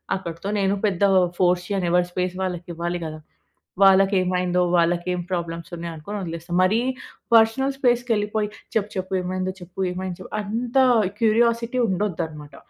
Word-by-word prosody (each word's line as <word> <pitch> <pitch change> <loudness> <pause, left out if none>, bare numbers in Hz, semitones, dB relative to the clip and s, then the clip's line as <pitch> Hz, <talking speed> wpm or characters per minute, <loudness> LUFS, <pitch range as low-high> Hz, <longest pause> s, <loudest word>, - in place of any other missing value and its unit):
అక్కడితో 170 +1 -5
నేను 195 +1 +2
పెద్దగా 195 -1 +3 0.2
ఫోర్స్ 180 -1 +2
చేయను. 190 -3 0
ఎవరి 175 0 +3
స్పేస్ 180 0 -2
వాళ్లకివ్వాలి 175 -1 -3
గదా? 155 0 -6 0.6
వాళ్లకేమైందో, 185 -2 +3 0.2
వాళ్లకేం 175 +1 +1
ప్రాబ్లమ్స్ 170 0 -3
ఉన్నాయనుకొని 170 +4 -6
వదిలేస్తా. 170 +1 -6
మరీ 215 +5 +3 0.5
పర్సనల్ 265 +5 +4
స్పేస్‌కెళ్లిపోయి, 220 -4 +1 0.3
"చెప్పు 210 -1 +1
చెప్పు? 185 +1 -4
ఏమైంది 185 +1 -2
చెప్పు? 180 +2 -12
ఏమైంది 185 -1 -5
చెప్పు?" - - -11
అంత 230 +5 -3 0.4
క్యూరియాసిటీ 230 +2 +2
ఉండొద్దన్నమాట. 165 -6 -3
185 Hz, 125 wpm, -23 LUFS, 175-210 Hz, 0.6 s, పర్సనల్